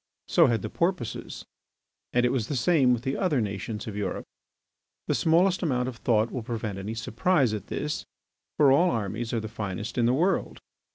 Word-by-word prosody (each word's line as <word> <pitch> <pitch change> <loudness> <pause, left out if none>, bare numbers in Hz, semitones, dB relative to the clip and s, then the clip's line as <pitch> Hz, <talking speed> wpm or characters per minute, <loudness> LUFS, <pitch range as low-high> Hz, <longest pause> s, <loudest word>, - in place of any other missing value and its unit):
So 170 -4 +5
had 115 -5 0
the - - -3
Porpoises. 170 - -2 0.7
And 125 0 +2
it 125 - +2
was 120 -5 -1
the 145 - -2
same 130 0 +3
with 120 -1 0
the 135 +1 -1
other 170 -8 +1
nations 105 0 -3
of 110 - -6
Europe. 105 -2 -3 0.8
The - - 0
smallest 175 +3 +3
amount 125 -7 0
of 125 -3 -5
thought 110 -1 +1
will 125 - -3
prevent 110 -3 -4
any 105 +3 -5
surprise 125 +3 +1
at 105 - -5
this. 150 0 -3 0.5
For 145 -3 +6
all 170 +7 +5
armies 115 - -2
are 115 - 0
the 110 - -5
finest 105 +2 -4
in 115 - +3
the 120 - +3
world. 180 +7 0
120 Hz, 190 wpm, -27 LUFS, 110-150 Hz, 0.8 s, For